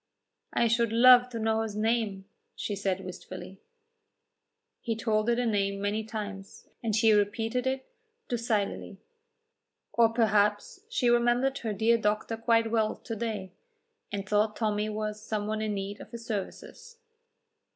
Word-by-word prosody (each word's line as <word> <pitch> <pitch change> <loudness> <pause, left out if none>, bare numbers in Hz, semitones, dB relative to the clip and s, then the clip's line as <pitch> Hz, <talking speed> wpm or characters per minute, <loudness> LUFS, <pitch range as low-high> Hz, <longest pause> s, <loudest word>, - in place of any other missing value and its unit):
"I 235 - +2
should 230 0 +2
love 250 +1 +7
to 240 - -6
know 220 0 +1
his 220 -2 -4
name," 215 -3 0 0.3
she 205 - -3
said 195 -1 -2
wistfully. 185 +1 -9 1.2
He 230 -2 -2
told 220 0 0
her 235 - +3
the 245 +1 0
name 200 -3 0
many 205 +2 -1
times, 205 -3 -7 0.2
and 220 -3 0
she 220 0 +5
repeated 225 +4 0
it 265 0 -1 0.4
docilely. 220 -4 -2 1.0
Or 230 -1 +5
perhaps 210 - +1
she 250 - +2
remembered 240 +3 +2
her 225 - -3
dear 225 +3 +3
doctor 215 +1 0
quite 230 0 +2
well 220 -2 +1
to 225 - -7
day, 210 -4 -4 0.6
and 200 -1 -4
thought 210 +1 +2
Tommy 215 -1 0
was 215 0 -4
some 215 -1 -3
one 215 0 -2
in 215 -1 -1
need 200 +1 -5
of - - -11
his 235 -1 -9
services. 465 - -6
220 Hz, 150 wpm, -29 LUFS, 205-235 Hz, 1.2 s, love